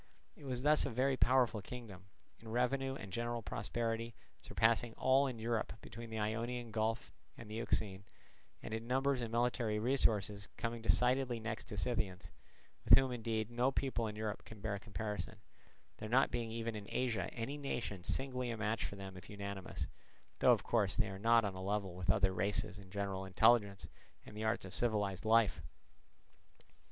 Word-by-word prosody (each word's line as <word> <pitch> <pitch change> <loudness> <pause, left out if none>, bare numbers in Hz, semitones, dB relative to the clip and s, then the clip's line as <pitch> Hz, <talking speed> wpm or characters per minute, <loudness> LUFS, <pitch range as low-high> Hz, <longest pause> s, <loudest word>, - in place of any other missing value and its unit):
It 145 - -13
was 130 -1 -3
thus 150 +1 +6
a - - -1
very 130 +3 +2
powerful 125 -4 +3
kingdom; 100 -4 -9 0.3
in 115 - -14
revenue 135 +3 0
and 100 -8 -8
general 120 0 -2
prosperity 115 +4 -2 0.2
surpassing 115 +1 +1
all 135 +2 +4
in 125 -3 -4
Europe 110 -7 -1
between 115 +1 -9
the 110 - -4
Ionian 115 +2 -2
Gulf 110 +1 -1 0.3
and 115 - -9
the 105 - -8
Euxine, 100 -3 -1 0.6
and - - -5
in 115 +1 -4
numbers 135 +1 +2
and 115 -2 -3
military 115 -2 +1
resources 105 -4 +1
coming 115 0 -3
decidedly 125 +1 +2
next 110 0 -4
to 105 - -7
the - - -2
Scythians, 100 -7 -2 0.5
with - - +9
whom 135 -1 +2
indeed 115 -2 -2
no 120 +3 +2
people 130 -4 -1
in 105 - -5
Europe 105 -1 -3
can 110 - -11
bear 100 -1 -2
comparison, 105 0 -4 0.6
there 110 - -6
not 130 +3 +4
being 120 -1 -2
even 115 0 -3
in 105 -1 -7
Asia 115 -8 -1
any 120 +5 -4
nation 120 -10 -4
singly 125 +2 -1
a 115 - -3
match 110 +1 -1
for - - -4
them 95 -1 -8
if 95 - -11
unanimous, 100 -2 -5 0.5
though - - +6
of - - +3
course 105 -5 +2
they 110 -4 +2
are 95 0 -6
not 115 +1 +5
on 100 - -2
a 95 - -7
level 100 -1 -1
with 90 -1 -6
other 100 -3 +4
races 100 +2 -1
in 100 -2 -13
general 100 -1 -3
intelligence 100 +1 +3 0.4
and - - -11
the 110 - -4
arts 110 -2 0
of 95 - -9
civilized 105 -4 0
life. 110 -1 +4
115 Hz, 180 wpm, -36 LUFS, 100-120 Hz, 0.6 s, with